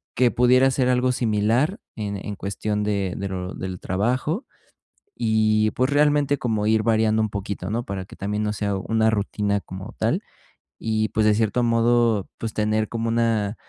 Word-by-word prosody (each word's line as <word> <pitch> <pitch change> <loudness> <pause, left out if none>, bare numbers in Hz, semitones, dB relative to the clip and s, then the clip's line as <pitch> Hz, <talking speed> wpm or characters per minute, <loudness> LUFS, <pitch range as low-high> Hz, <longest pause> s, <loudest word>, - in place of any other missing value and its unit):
que 125 -2 +3
pudiera 125 +2 +4
ser 130 -1 +1
algo 125 0 +2
similar 120 - +1 0.2
en 105 -2 -3
en 100 +1 -6
cuestión 105 +2 -3
de 100 -3 -1
de 100 - -3
lo 90 -1 -4
del 95 -1 -5
trabajo. 125 - -1 0.7
Y, 110 -1 +2
pues, 130 +1 +1
realmente 145 -1 +3
como 110 -4 -1
ir 110 0 +3
variando 110 -1 +2
un 110 - -1
poquito, 100 -1 -4
¿no? 120 +2 -1
Para 95 -1 -4
que - - -13
también 105 +2 -2
no 105 - 0
sea 100 -1 -1
una 110 +3 +1
rutina 100 -1 -1
como 95 0 -9
tal, - - 0 0.6
y, 110 -1 0
pues, 110 0 +2
de 105 -1 +4
cierto 110 +3 +1
modo, 115 -3 +2
pues, 115 -2 -4
tener 110 0 0
como 115 0 -2
una, 115 -3 +1
110 Hz, 175 wpm, -23 LUFS, 105-120 Hz, 0.7 s, pudiera